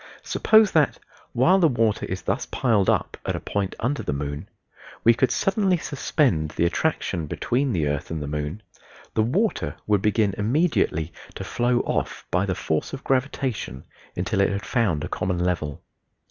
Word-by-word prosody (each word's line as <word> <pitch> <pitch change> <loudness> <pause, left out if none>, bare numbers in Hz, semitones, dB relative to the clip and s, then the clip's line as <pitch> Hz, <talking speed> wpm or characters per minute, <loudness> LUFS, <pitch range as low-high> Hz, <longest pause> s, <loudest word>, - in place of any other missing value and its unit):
Suppose 220 -2 +4
that 155 -4 +3 0.3
(while 175 +11 +4
the 170 - +5
water 115 -6 +1
is 95 0 -4
thus 100 +8 -1
piled 110 -7 +2
up - - 0
at - - -2
a - - -3
point 100 -2 -2
under 140 +5 -1
the - - -2
moon) 70 +1 -4 0.5
we 115 - +7
could 130 +2 +2
suddenly 195 - +2
suspend 130 - 0
the 85 - +2
attraction 85 - -1
between 125 - 0
the 85 -8 0
earth 75 -1 -2
and 80 - -3
the 75 - -4
moon 75 +7 -4 0.5
the 110 - +2
water 185 - 0
would 105 -2 +2
begin 105 -1 +2
immediately 105 - +1 0.2
to - - -5
flow 120 0 +1
off - - -2
by 95 +3 +1
the 95 - 0
force 80 -1 -2
of 135 - -6
gravitation 130 - -1 0.3
until 90 +2 0
it 100 - +3
had 100 +1 -3
found 105 - +1
a - - -2
common 90 -1 -2
level. 85 -5 -2
105 Hz, 175 wpm, -24 LUFS, 85-135 Hz, 0.5 s, we